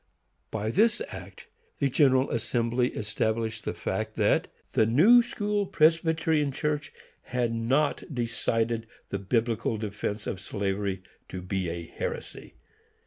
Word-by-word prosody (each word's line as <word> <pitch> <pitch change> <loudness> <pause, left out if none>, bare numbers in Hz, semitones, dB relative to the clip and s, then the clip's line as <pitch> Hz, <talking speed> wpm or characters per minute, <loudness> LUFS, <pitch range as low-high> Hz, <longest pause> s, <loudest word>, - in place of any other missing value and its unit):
By 110 0 -2
this 225 - +3
act - - -10 0.3
the 140 - +2
General 135 -1 +3
Assembly 120 +1 +1
established 110 +1 -2
the - - -2
fact - - -3
that - - +2 0.2
the 110 - +3
New 190 - +7
School 205 -3 -1
Presbyterian 160 -2 +3
Church 150 +2 -2 0.3
had 120 -2 -1
not 130 +6 +1
decided 115 -2 -1 0.2
the 100 - -2
Biblical 115 +2 0
defence 105 0 -4
of 90 - -4
slavery 100 -2 -2 0.3
to 90 -1 -6
be 90 -1 -2
a 85 0 -4
heresy. - - -6
115 Hz, 125 wpm, -28 LUFS, 105-150 Hz, 0.3 s, New